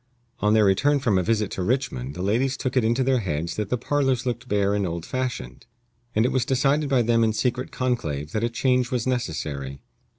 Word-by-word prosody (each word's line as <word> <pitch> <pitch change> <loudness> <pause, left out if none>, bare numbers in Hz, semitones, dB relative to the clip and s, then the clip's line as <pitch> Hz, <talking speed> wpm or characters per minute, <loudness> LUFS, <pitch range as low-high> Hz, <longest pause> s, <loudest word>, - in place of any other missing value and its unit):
On 105 +1 +3
their 110 -1 +5
return 135 +10 +3
from 115 -9 +2
a - - +2
visit 105 +1 0
to - - -4
Richmond 90 - -1
the 90 - -4
ladies 125 +7 +1
took 130 0 -3
it 130 - +3
into 120 +4 +2
their 130 -1 +2
heads 85 -4 -3
that 105 -2 -3
the 125 - +1
parlors 135 0 0
looked 120 0 -3
bare 100 -2 +1
and 100 -2 0
old 85 0 -4
fashioned, 120 - -4 0.5
and 110 +2 +3
it 125 - +1
was 130 - +1
decided 135 +3 +1
by 130 -3 +3
them 115 0 +3
in 110 -1 +2
secret 125 +3 -1
conclave 80 - -2
that 110 - -1
a 120 - +1
change 125 +1 +1
was 125 -3 -1
necessary. 75 - -3
115 Hz, 220 wpm, -24 LUFS, 95-130 Hz, 0.5 s, their